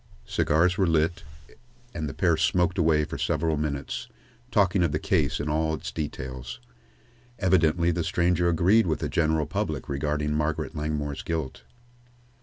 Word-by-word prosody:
Cigars 90 Hz, +5 st, +2 dB
were 95 Hz, -, +3 dB
lit, 80 Hz, +1 st, +1 dB, 0.7 s
and 75 Hz, -3 st, -3 dB
the -, -, -7 dB
pair 85 Hz, -3 st, +3 dB
smoked 90 Hz, +2 st, +1 dB
away 80 Hz, -2 st, +3 dB
for -, -, -7 dB
several 80 Hz, -2 st, 0 dB
minutes, 70 Hz, -2 st, -3 dB, 0.4 s
talking 100 Hz, -5 st, +2 dB
of 85 Hz, -4 st, +2 dB
the 75 Hz, -, 0 dB
case 80 Hz, -3 st, 0 dB
in 75 Hz, -, -3 dB
all 80 Hz, +1 st, 0 dB
of 75 Hz, -, -10 dB
its -, -, -5 dB
details. 65 Hz, -5 st, -5 dB, 0.8 s
Evidently 85 Hz, -3 st, +3 dB
the 85 Hz, 0 st, -1 dB
stranger 85 Hz, +1 st, +1 dB
agreed 90 Hz, +6 st, +4 dB
with 80 Hz, -, +1 dB
the -, -, -3 dB
general 80 Hz, -2 st, +1 dB
public 80 Hz, -4 st, -3 dB
regarding 75 Hz, +1 st, -1 dB
Margaret 75 Hz, 0 st, -2 dB
Langmore's 75 Hz, -1 st, -3 dB
guilt. 80 Hz, -5 st, -4 dB
80 Hz, 155 wpm, -26 LUFS, 75-85 Hz, 0.8 s, agreed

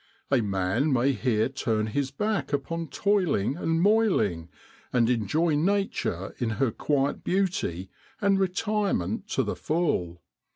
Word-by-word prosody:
A 135 Hz, -3 st, +4 dB
man 100 Hz, +8 st, 0 dB
may 130 Hz, +1 st, +3 dB
here 115 Hz, -3 st, +1 dB
turn 115 Hz, -5 st, -1 dB
his 135 Hz, +5 st, -1 dB
back 210 Hz, +9 st, -2 dB
upon 165 Hz, +4 st, -2 dB
toiling 175 Hz, -, +1 dB
and 165 Hz, -1 st, 0 dB
moiling, 180 Hz, -, +2 dB, 0.4 s
and 120 Hz, -2 st, +3 dB
enjoy 140 Hz, -, +1 dB
Nature 165 Hz, -, 0 dB
in 120 Hz, -, 0 dB
her 130 Hz, -2 st, +2 dB
quiet 140 Hz, +3 st, -1 dB
beauty 175 Hz, -, -1 dB, 0.3 s
and 200 Hz, -2 st, +2 dB
retirement 195 Hz, -, -1 dB
to -, -, 0 dB
the -, -, -3 dB
full. 120 Hz, -, -1 dB
140 Hz, 130 wpm, -27 LUFS, -, 0.4 s, A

